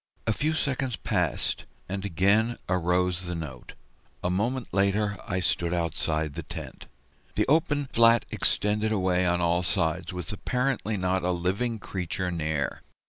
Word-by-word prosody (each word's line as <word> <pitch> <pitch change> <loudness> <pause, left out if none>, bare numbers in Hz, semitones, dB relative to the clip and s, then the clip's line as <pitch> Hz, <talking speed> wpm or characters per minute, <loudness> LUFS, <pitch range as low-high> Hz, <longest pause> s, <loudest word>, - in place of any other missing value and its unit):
A 115 - +2
few 155 +7 0
seconds 135 -5 -1
passed, - - -1 0.2
and 95 +1 -3
again 100 +5 +2
arose 90 0 +1
the 90 - -2
note; 75 -6 -7 0.5
a 90 - +1
moment 120 +7 -1
later 100 +1 +2
I 95 -1 -1
stood 85 0 +1
outside 80 -2 0
the 85 - -4
tent. - - -8 0.5
The - - +2
open 145 -1 +3
flat 115 -2 +5
extended 105 +1 +1
away 90 -3 +2
on 90 0 +2
all 85 +1 +2
sides, 85 -1 0
with 90 +4 -4
apparently 125 -1 -1
not 95 0 +1
a 90 - 0
living 95 +7 0
creature 90 -2 -3
near. 80 -4 -1
95 Hz, 145 wpm, -27 LUFS, 85-110 Hz, 0.5 s, flat